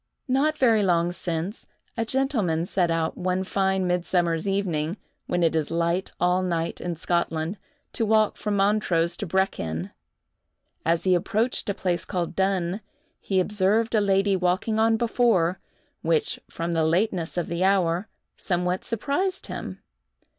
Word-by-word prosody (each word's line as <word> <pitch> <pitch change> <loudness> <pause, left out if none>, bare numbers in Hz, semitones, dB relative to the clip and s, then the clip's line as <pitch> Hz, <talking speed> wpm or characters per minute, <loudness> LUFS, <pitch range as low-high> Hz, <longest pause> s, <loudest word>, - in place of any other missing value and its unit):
Not 285 +4 +2
very 230 -6 +4
long 175 -3 +2
since, 175 +3 -4 0.3
a 230 - -1
gentleman 225 - 0
set 180 -2 +1
out, 165 -1 0
one 185 +1 0
fine 190 0 0
midsummer's 175 -1 +1
evening, 180 -3 -1 0.3
when 175 -1 0
it 165 -1 +2
is 155 -2 0
light 170 +2 0
all 180 +1 +2
night 170 -2 -2
in 175 -1 -3
Scotland, 170 +2 -1 0.3
to 230 - -1
walk 215 -1 +3
from 210 -1 -2
Montrose 195 -4 +2
to 205 - -4
Brechin. 95 - -1 0.9
As 165 +1 +1
he 185 - +3
approached 215 +7 0
a 200 - 0
place 175 -2 -1
called 180 -3 -3
Dunn, 190 0 0 0.4
he 190 -2 0
observed 210 +4 +1
a 215 - +4
lady 195 0 +2
walking 185 +4 0
on 225 0 +4
before, 220 -7 +2 0.4
which, 160 -2 +1
from 170 +1 -3
the 165 -1 +1
lateness 175 +1 0
of 175 - 0
the 170 +2 -2
hour, 190 0 +2 0.3
somewhat 180 0 -1
surprised 290 - -1
him. - - -7
185 Hz, 145 wpm, -25 LUFS, 170-210 Hz, 0.9 s, very